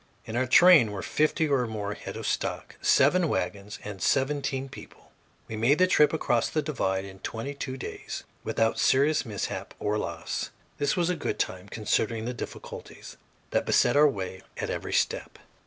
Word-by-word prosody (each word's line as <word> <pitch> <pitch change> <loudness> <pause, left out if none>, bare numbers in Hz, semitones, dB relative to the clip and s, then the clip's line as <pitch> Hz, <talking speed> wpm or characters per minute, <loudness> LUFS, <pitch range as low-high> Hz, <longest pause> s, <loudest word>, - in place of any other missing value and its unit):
In 110 - -6
our 130 +2 +1
train 155 - +7
were 100 - -5
fifty 155 +1 +1
or 135 -4 +1
more 105 -2 -3
head - - -8
of - - -6
stock, - - -2
seven 165 +5 +4
wagons, 100 +1 -3
and 100 -3 -7
seventeen 135 - 0
people. - - -13 0.4
We 110 - -5
made 120 +7 +3
the 185 - +5
trip 150 -5 +4
across 120 -7 +1
the 155 - -1
divide 95 -10 -1
in 95 -1 -11
twenty 115 +8 -5
two 135 -2 -5
days - - -6 0.2
without 115 0 +1
serious 140 0 +3
mishap 105 -2 -4
or 105 +1 -1
loss. 85 -3 -4 0.3
This 145 +4 +1
was 175 0 +2
good 180 - -2
time, 95 +2 -3
considering 110 +1 -1
the 125 - -2
difficulties 120 - -9 0.3
that - - 0
beset 120 - +4
our 150 +1 +7
way 95 -5 -5 0.2
at - - -2
every - - -4
step. - - 0
120 Hz, 170 wpm, -27 LUFS, 105-145 Hz, 0.4 s, train